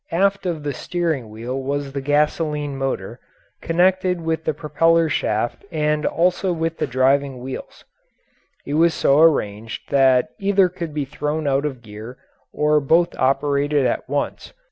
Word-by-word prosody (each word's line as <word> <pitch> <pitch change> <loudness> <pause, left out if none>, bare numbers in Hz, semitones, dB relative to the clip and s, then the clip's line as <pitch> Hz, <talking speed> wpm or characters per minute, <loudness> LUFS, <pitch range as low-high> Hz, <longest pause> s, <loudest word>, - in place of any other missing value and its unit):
Aft 195 +2 +1
of 160 -4 -3
the 145 -1 -2
steering 160 -5 -2
wheel 120 +5 -5
was 140 +1 -3
the 140 - -3
gasoline 150 0 0
motor, 135 0 -3 0.4
connected 180 +1 +2
with 160 -1 -2
the 155 - +1
propeller 165 +2 +2
shaft 115 -5 -1
and 150 -1 0
also 180 +2 +1
with 165 -1 -2
the - - 0
driving 135 +1 +1
wheels; 130 +1 -8 0.8
it 140 - -4
was 165 +1 +3
so 140 -1 +3
arranged 115 -9 +1
that 130 -2 +4
either 195 -2 +3
could 170 -3 -6
be 145 -2 -1
thrown 150 +3 -3
out 140 +1 +1
of 130 -5 -5
gear 110 +3 -10 0.3
or 150 0 +2
both 165 +5 +2
operated 140 +1 +1
at 120 - -1
once. 145 - -3
150 Hz, 150 wpm, -21 LUFS, 135-165 Hz, 0.8 s, that